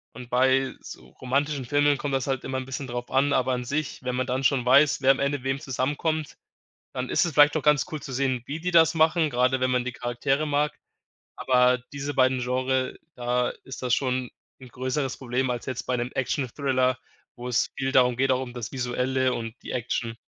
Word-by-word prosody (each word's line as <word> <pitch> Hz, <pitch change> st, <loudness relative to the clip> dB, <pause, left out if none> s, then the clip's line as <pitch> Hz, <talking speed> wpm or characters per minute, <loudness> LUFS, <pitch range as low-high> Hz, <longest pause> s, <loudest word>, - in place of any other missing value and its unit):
Und 125 Hz, 0 st, -9 dB
bei 130 Hz, +1 st, +2 dB
so -, -, -11 dB
romantischen 140 Hz, +1 st, -2 dB
Filmen 145 Hz, +2 st, +2 dB
kommt 140 Hz, 0 st, -3 dB
das 135 Hz, -1 st, 0 dB
halt 135 Hz, -1 st, -2 dB
immer 130 Hz, 0 st, -3 dB
'n 130 Hz, -, -4 dB
bisschen 135 Hz, +1 st, -5 dB
drauf 120 Hz, 0 st, -5 dB
an, 140 Hz, +2 st, +2 dB
aber 130 Hz, 0 st, +2 dB
an 125 Hz, -1 st, -2 dB
sich, 150 Hz, +4 st, -3 dB
wenn 125 Hz, -1 st, -3 dB
man 130 Hz, 0 st, 0 dB
dann 130 Hz, +1 st, -2 dB
schon 125 Hz, -2 st, +2 dB
weiß, 140 Hz, +3 st, +5 dB
wer 135 Hz, 0 st, +6 dB
am 135 Hz, -, 0 dB
Ende 140 Hz, -1 st, -1 dB
wem 135 Hz, +1 st, -1 dB
zusammenkommt, 145 Hz, +3 st, -2 dB, 0.6 s
dann 125 Hz, 0 st, -3 dB
ist -, -, +3 dB
es 170 Hz, -, -3 dB
vielleicht 145 Hz, 0 st, +6 dB
doch 155 Hz, -, +1 dB
ganz 150 Hz, -3 st, +4 dB
cool 155 Hz, -, -4 dB
zu 135 Hz, -2 st, -7 dB
sehen, 130 Hz, -2 st, 0 dB
wie 150 Hz, -, -4 dB
die 180 Hz, +2 st, -2 dB
das 165 Hz, -1 st, +5 dB
machen, 160 Hz, 0 st, +3 dB
gerade 125 Hz, 0 st, +1 dB
wenn 130 Hz, 0 st, +1 dB
man 125 Hz, -1 st, +1 dB
die 125 Hz, -, -3 dB
Charaktere 125 Hz, +4 st, -1 dB
mag, 150 Hz, 0 st, +1 dB, 0.6 s
aber 125 Hz, 0 st, +3 dB, 0.2 s
diese 140 Hz, +1 st, -3 dB
beiden 130 Hz, -1 st, +2 dB
Genre 130 Hz, +1 st, -1 dB, 0.2 s
da 125 Hz, 0 st, 0 dB, 0.2 s
ist 130 Hz, -2 st, -8 dB
das 125 Hz, -1 st, +2 dB
schon 130 Hz, -2 st, -1 dB, 0.3 s
'n 130 Hz, -, -11 dB
größeres 130 Hz, +2 st, -2 dB
Problem 130 Hz, 0 st, -1 dB
als 120 Hz, -1 st, -3 dB
jetzt 130 Hz, -2 st, -4 dB
bei 125 Hz, -, -1 dB
'nem 120 Hz, +1 st, -3 dB
Action-Thriller, 130 Hz, -1 st, 0 dB, 0.4 s
wo 125 Hz, 0 st, -7 dB
es 125 Hz, -1 st, +1 dB
viel 135 Hz, 0 st, 0 dB
darum 125 Hz, -2 st, +3 dB
geht, 135 Hz, 0 st, +2 dB
auch 130 Hz, 0 st, +2 dB
um 120 Hz, -, -7 dB
das 120 Hz, -2 st, -6 dB
Visuelle 130 Hz, 0 st, 0 dB
und 115 Hz, -1 st, -4 dB
die -, -, -8 dB
Action. 115 Hz, -1 st, -3 dB
130 Hz, 215 wpm, -26 LUFS, 125-140 Hz, 0.6 s, wer